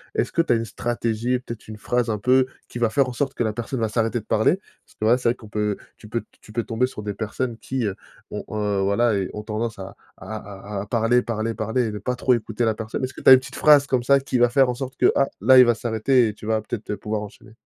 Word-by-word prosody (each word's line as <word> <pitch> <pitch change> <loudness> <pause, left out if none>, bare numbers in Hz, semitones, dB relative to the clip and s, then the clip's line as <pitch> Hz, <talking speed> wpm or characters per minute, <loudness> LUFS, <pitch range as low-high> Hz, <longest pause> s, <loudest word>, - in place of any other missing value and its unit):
Est-ce 430 - 0
que 165 - +2
tu 165 - -1
as - - +5
une 115 0 -1
stratégie 120 0 -2
et 125 - +1
peut-être 115 -3 -9
une 110 0 -8
phrase 120 +2 -1
un 110 - 0
peu 130 +4 +3 0.2
qui 120 - -6
va 115 -1 +2
faire 135 +4 +2
en 125 - -5
sorte 135 +3 -2
que - - 0
la 110 -1 -1
personne 120 +3 -4
va 110 - +1
s'arrêter 115 +2 0
de 110 - -14
parler? 110 - +2 0.3
Parce - - -25
que 110 - -1
là 120 +3 +5
c'est 120 - +1
vrai 120 - +1
qu'on 110 - -14
peut 105 -1 -1 0.2
tu 105 - -14
peux 115 +1 -2 0.2
tu 110 - -15
peux 115 +1 -1
tomber 120 +3 0
sur 105 - -8
des 105 0 -3
personnes 115 +3 -3
qui, 130 -3 -2
heu, 100 -2 -2 0.4
ont, - - -4
heu, 105 -2 -1
voilà 100 +4 +2
et 95 -2 -1
ont 105 - -6
tendance 110 +1 -3
à 95 0 -8 0.2
à - - -12 0.5
à - - -2
à - - -6
parler, 115 +2 +2
parler, 115 -1 -2
parler 110 +4 -1
et 110 - -2
ne 105 - -5
pas 125 +5 -2
trop 125 0 +2
écouter 115 0 -1
la 110 - +2
personne. 110 +3 -5
Est-ce 130 0 -3
que - - -10
tu - - +5
as 130 - +12
une 130 - +8
petite 130 0 -10
phrase 145 -2 +6
comme 130 -3 +1
ça 140 +2 +5
qui 135 -1 -2
va 120 0 +5
faire 130 +1 +4
en - - 0
sorte 130 +1 -6
que, 125 - +5
ah, 135 - +3
là, 130 +5 +6
il 125 - +9
va 120 -1 +3
s'arrêter 120 +2 +2
et - - -5
tu 105 - -12
vas 110 -1 +1
peut-être, 110 +1 -6
heu, 105 - -2
pouvoir 105 +2 -3
enchaîner? 105 +1 -11
115 Hz, 300 wpm, -23 LUFS, 110-125 Hz, 0.5 s, as